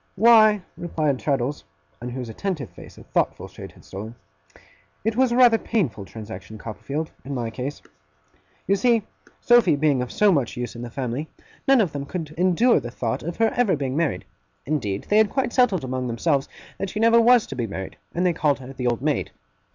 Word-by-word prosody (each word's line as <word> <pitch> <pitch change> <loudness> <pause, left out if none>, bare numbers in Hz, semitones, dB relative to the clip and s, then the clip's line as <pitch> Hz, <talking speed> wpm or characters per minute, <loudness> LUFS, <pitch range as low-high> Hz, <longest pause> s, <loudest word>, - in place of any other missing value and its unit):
'Why,' 215 -1 +6
replied 155 -6 -1
Traddles, 140 -1 -1 0.4
on 120 - -5
whose 125 0 -5
attentive 160 - -4
face - - -13
a - - -12
thoughtful - - -1
shade - - -11
had - - -19
stolen, 110 +4 -8 0.9
'it 225 0 +1
was 255 0 +3
rather 240 -2 +6
a - - -13
painful 145 - -1
transaction, 110 +2 -9
Copperfield, 140 +9 -5
in 140 +1 -5
my 115 -3 -3
case. 130 +5 -5 0.8
You 200 - +3
see, 230 +2 +2 0.4
Sophy 240 -10 +5
being 145 -3 +2
of 125 - -4
so 210 -1 +4
much 140 -10 0
use 120 -1 -4
in 115 - -7
the 120 - -6
family, 130 +4 -4 0.4
none 270 -1 +6
of 185 -7 0
them 140 -1 -5
could 160 -3 -5
endure 185 +8 +3
the 120 - -6
thought 115 -1 -3
of 170 +1 -5
her 225 -1 +2
ever 235 -8 +3
being 135 -2 -3
married. 150 - -1 0.4
Indeed, 110 -10 -2
they 210 - +3
had 220 -1 +4
quite 265 -3 -1
settled 225 - +3
among 130 0 -3
themselves 135 +4 0 0.3
that 195 - -2
she 210 - -4
never 230 +1 +5
was 240 0 +5
to 135 - -7
be 120 -3 -2
married, 95 -2 -6 0.2
and 175 +2 +1
they 180 - +3
called 150 -3 +1
her 135 0 -10
the 125 -2 -3
old 120 +1 -1
maid. 150 -1 0
150 Hz, 200 wpm, -23 LUFS, 125-210 Hz, 0.9 s, Why